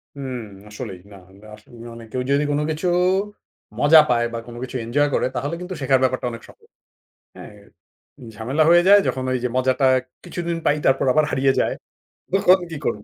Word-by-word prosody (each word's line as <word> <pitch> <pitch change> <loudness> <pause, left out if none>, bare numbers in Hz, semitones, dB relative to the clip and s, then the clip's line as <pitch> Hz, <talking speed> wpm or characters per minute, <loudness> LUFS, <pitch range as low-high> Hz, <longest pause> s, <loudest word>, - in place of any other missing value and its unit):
উম 130 -3 -5 0.3
আসলেই 95 -3 -8
না। 100 - -12
আমরা 100 +3 -17
আসলেই 115 +2 -15
অনেকে 115 +1 -12
ওই - - -5
যদি 140 +1 +2
কোন 145 - 0
কিছু 160 +4 -2 0.9
মজা 155 +2 +7
পায় 120 -1 +2
বা 115 - -3
কোন 120 - -10
কিছু 130 - -8
এঞ্জয় 145 +5 +1
করে - - +1
তাহলে 145 +5 -3
কিন্তু 180 +1 -6
শেখার 130 -1 +2
ব্যাপারটা 130 -1 0
অনেক 115 0 -9
সহজ। - - -20 0.7
হ্যাঁ, - - -11 0.8
ঝামেলা 130 +9 -1
হয়ে 175 0 +6
যায় 205 0 +8
যখন 130 0 -2
ওইযে 125 -1 -1
মজাটা 130 +1 +1 0.4
কিছুদিন 170 -1 -4
পাই, 145 - +2
তারপর 135 0 +2
আবার 155 +2 +3
হারিয়ে 135 0 +2
যায়। - - 0 0.6
তখন 190 -1 +4
"কি 160 - -5
করবো?" 105 - -2
130 Hz, 180 wpm, -21 LUFS, 120-155 Hz, 0.9 s, যায়